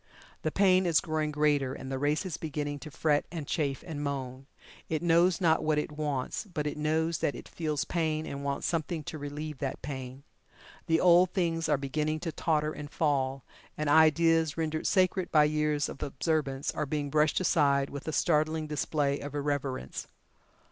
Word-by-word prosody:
The 155 - 0
pain 185 -1 +4
is 165 -3 +4
growing 155 -2 -1
greater, 145 -3 +1
and 135 - -7
the 135 - -2
race 150 +6 0
is 180 -4 -3
beginning 145 -2 -4
to 155 - -9
fret 150 0 +1
and 165 -4 -5
chafe, 140 -3 -1
and 150 -4 -5
moan. 135 -2 -4 0.4
It 160 0 -1
knows 170 +1 +4
not 165 -3 +3
what 155 -1 +1
it 150 - -1
wants, 150 - -3
but 150 -3 -2
it 150 - -2
knows 155 +1 0
that 145 - 0
it - - -9
feels 155 -4 -2
pain 160 -2 -1
and 140 0 -6
wants 140 0 -2
something 165 -1 -1
to 155 - -6
relieve 145 0 -6
that 135 -2 -4
pain. 130 -1 -6 0.6
The 165 0 +3
old 180 0 +6
things 165 -4 0
are 150 - +3
beginning 150 +3 -1
to 170 -2 -3
totter 155 -1 0
and 145 -1 -7
fall, 135 -4 0 0.3
and 150 -1 0
ideas 160 0 +4
rendered 160 -1 -1
sacred 185 -1 +2
by 155 -2 +6
years 150 -1 +1
of - - -9
observance 145 -1 -1
are 150 - -3
being 145 0 -2
brushed 155 +1 +3
aside 140 -6 +2
with 140 +2 -7
a - - 0
startling 155 0 +1
display 145 -1 -1
of 145 0 -7
irreverence. 140 - -3
150 Hz, 180 wpm, -29 LUFS, 145-160 Hz, 0.6 s, old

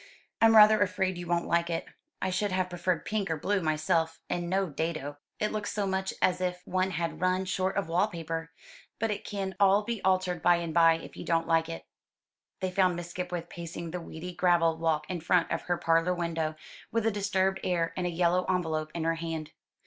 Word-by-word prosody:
I'm 225 0 +6
rather 215 0 +8
afraid 185 -2 0
you 175 - -6
won't 170 0 +1
like 170 0 +1
it; 165 -1 -2 0.4
I 190 - 0
should 200 +2 0
have 185 -1 0
preferred 175 -1 -1
pink 210 -3 -1
or 160 - 0
blue 200 +5 0
myself, 160 +1 0
and 175 -1 -2
no 190 +1 +1
dado. 155 -2 -3 0.2
It 210 - 0
looks 215 -1 -3
so 205 -1 -1
much 190 0 -1
as 180 0 +2
if 180 0 -2
one 185 +1 0
had 170 -2 -3
run 185 +1 +1
short 190 +1 -1
of 200 - 0
wall 175 +5 +2
paper. 165 -3 -5 0.5
But 225 0 0
it 205 - -4
can 195 -2 -4
all 200 +1 +5
be 230 -1 -3
altered 185 -2 +1
by 175 - +5
and 170 -2 -3
by, 165 -1 +6
if - - -11
you - - -7
don't 165 -1 +1
like 165 0 +2
it." 165 - -6 0.8
They 185 -1 -1
found 185 -1 +3
Miss 175 0 -6
Skipwith 180 -1 -4
pacing 170 -1 -7
the 180 0 -4
weedy 165 +2 -7
gravel 170 -2 +3
walk 155 -2 0
in 180 -3 -4
front 170 +1 +2
of 170 - -1
her 175 -1 0
parlour 165 +2 +2
window, 165 -2 -2 0.4
with 230 -1 0
a 225 - +3
disturbed 190 -2 0
air, 170 -2 0
and 180 -1 -1
a - - 0
yellow 175 +1 +2
envelope 160 -4 0
in 165 - -2
her 165 0 +2
hand. 160 -2 -4
175 Hz, 215 wpm, -29 LUFS, 165-190 Hz, 0.8 s, rather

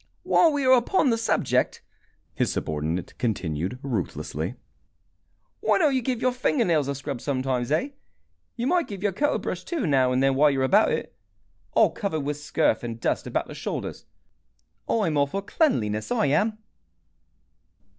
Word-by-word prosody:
"While 330 - +4
we 285 -2 -1
are 255 - +5
upon 255 +3 +3
the - - +3
subject," 225 - 0 0.5
his - - 0
subordinate 80 +3 -3
continued, 95 -3 -2
ruthlessly, 95 - -3 1.0
"why - - +2
don't 305 -6 +3
you 260 - +1
give 245 -1 -2
your 255 - +3
fingernails 220 - +1
a 140 - -2
scrub 135 -2 -5
sometimes, 130 -2 -1
eh? 160 - +1 0.7
You 240 - -3
might 345 +4 +2
give 200 -2 -7
your 205 - +2
coat 290 +10 0
a - - +2
brush, - - -4
too, 330 - -2
now 130 -4 +3
and 130 +1 +2
then, 135 0 +3
while 145 +3 +5
you 135 -2 0
are - - +2
about 200 +11 +4
it. - - -3 0.6
All - - +4
covered 190 -7 -2
with 145 +1 -3
scurf 145 -6 +1
and 115 -1 -5
dust - - -1
about - - -1
the - - -9
shoulders! - - -5 0.8
I'm 185 -10 +1
all 140 0 +3
for 195 +7 -4
cleanliness, 110 - 0
I 240 -9 +2
am." 205 +10 +1
150 Hz, 170 wpm, -25 LUFS, -, 1.0 s, are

